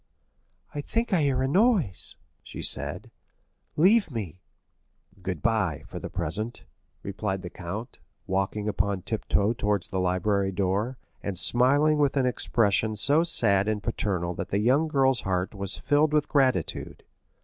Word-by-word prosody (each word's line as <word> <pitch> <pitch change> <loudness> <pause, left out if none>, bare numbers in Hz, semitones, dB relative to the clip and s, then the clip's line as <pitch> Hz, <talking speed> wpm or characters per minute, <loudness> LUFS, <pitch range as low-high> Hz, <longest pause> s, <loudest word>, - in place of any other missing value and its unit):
"I 145 - -3
think 230 +8 -2
I 175 - +3
hear 135 -3 +1
a - - +1
noise," 185 - +1 0.3
she - - -8
said; - - -1 0.7
"leave 200 +7 +4
me." 100 - -6 0.8
"Good 90 -3 -4
bye, 105 -10 0
for - - -8
the - - -6
present," 110 +10 -3 0.4
replied 95 -1 -3
the 90 - -7
count, 100 +7 -7 0.3
walking 95 +2 -1
upon 100 -2 -1
tiptoe 105 0 0
towards 105 -4 -1
the 95 - -2
library 95 +2 0
door, 100 +7 -1 0.2
and 100 -3 -4
smiling 145 - +4
with 145 -1 +2
an 130 - +3
expression 110 -3 +1
so 140 +9 +3
sad 100 - +2
and 105 -1 -1
paternal 95 -6 -2
that - - -5
the 100 - 0
young 130 +9 +3
girl's 135 -4 +2
heart 90 0 -2
was 100 -1 -4
filled 150 +1 +2
with 150 -1 +2
gratitude. 130 - 0
110 Hz, 150 wpm, -26 LUFS, 95-140 Hz, 0.8 s, leave